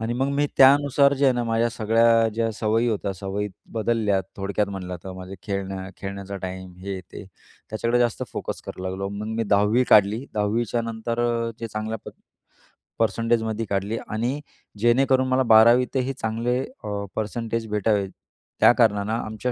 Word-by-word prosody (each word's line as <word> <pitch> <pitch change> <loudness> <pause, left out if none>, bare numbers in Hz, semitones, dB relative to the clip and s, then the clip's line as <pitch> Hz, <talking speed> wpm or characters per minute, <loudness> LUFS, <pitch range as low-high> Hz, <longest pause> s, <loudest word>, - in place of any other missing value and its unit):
आणि 115 +1 -2
मग 135 +3 0
मी 145 +1 +2
त्यानुसार 140 +1 +6
जे 140 +1 0
आहे 135 - +5
ना 120 - 0
माझ्या 115 0 +1
सगळ्या 115 0 +3
ज्या 115 0 0
सवयी 110 +2 +1
होत्या, 100 -3 -1
सवयी 100 +2 -4 0.2
बदलल्या. 110 -3 +1 0.2
थोडक्यात 100 +1 -1
म्हटलं 90 -2 -5
तर 95 - -6
माझं 95 +1 -8
खेळण्या 95 -1 -4
खेळण्याचा 100 0 -6
टाईम 95 0 -6
हे, 95 0 -5
ते 90 +3 -11 0.5
त्याच्याकडे 115 +3 0
जास्त 120 -2 +1
फोकस - - -4
करू 95 - -7
लागलो. 95 +1 -3
मग 100 +1 -5
मी 115 - +1
10 105 +4 +3
काढली 105 +4 +5
10 105 +3 +1
च्यानंतर 115 +1 -2 0.4
जे 115 - -3
चांगल्या 110 +1 -4 1.0
परसेंटेजमध्ये 115 0 0
काढली 100 +3 -2
आणि 120 +6 -2 0.4
जेणेकरून 130 +3 +3
मला 130 0 +2
12 120 +3 +7
तही 130 +1 0
चांगले 120 +1 -1 0.2
अ, 100 -1 -3
परसेंटेज 115 +1 -3
भेटावेत, 105 -2 +1 0.5
त्या - - +7
कारणानं 105 +1 +2
आमच्या 110 +1 -3
110 Hz, 155 wpm, -24 LUFS, 100-120 Hz, 1.0 s, 12